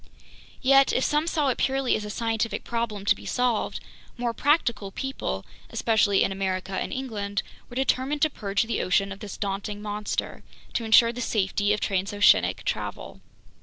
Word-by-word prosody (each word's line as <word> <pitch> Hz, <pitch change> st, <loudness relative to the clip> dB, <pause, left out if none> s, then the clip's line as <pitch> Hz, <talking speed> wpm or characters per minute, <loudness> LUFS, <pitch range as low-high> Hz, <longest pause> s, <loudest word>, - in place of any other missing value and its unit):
Yet 275 Hz, +1 st, +6 dB
if 260 Hz, -, +1 dB
some 300 Hz, +2 st, +1 dB
saw 300 Hz, -4 st, +1 dB
it 250 Hz, -, -1 dB
purely 270 Hz, -1 st, +1 dB
as 215 Hz, -, -3 dB
a -, -, -6 dB
scientific 225 Hz, +1 st, -1 dB
problem 230 Hz, -4 st, -3 dB
to -, -, +4 dB
be -, -, -11 dB
solved, 245 Hz, -3 st, 0 dB, 0.4 s
more 240 Hz, -1 st, -1 dB
practical 240 Hz, -8 st, +1 dB
people, 270 Hz, +7 st, -4 dB, 0.2 s
especially 215 Hz, -3 st, +2 dB
in -, -, 0 dB
America 190 Hz, 0 st, -2 dB
and 190 Hz, -, -2 dB
England, 210 Hz, -7 st, -3 dB, 0.3 s
were 245 Hz, -, -10 dB
determined 265 Hz, +2 st, +1 dB
to 310 Hz, -, +4 dB
purge 200 Hz, -3 st, -1 dB
the 225 Hz, -, -2 dB
ocean 195 Hz, +2 st, +1 dB
of 195 Hz, -, -7 dB
this 210 Hz, -3 st, -7 dB
daunting 200 Hz, +1 st, -3 dB
monster, 210 Hz, 0 st, -3 dB, 0.3 s
to 230 Hz, -, -1 dB
insure 230 Hz, +1 st, +6 dB
the 245 Hz, -, -5 dB
safety 205 Hz, -2 st, +1 dB
of 210 Hz, -, 0 dB
transoceanic 200 Hz, +1 st, +3 dB
travel. -, -, -4 dB
220 Hz, 165 wpm, -26 LUFS, 200-255 Hz, 0.4 s, Yet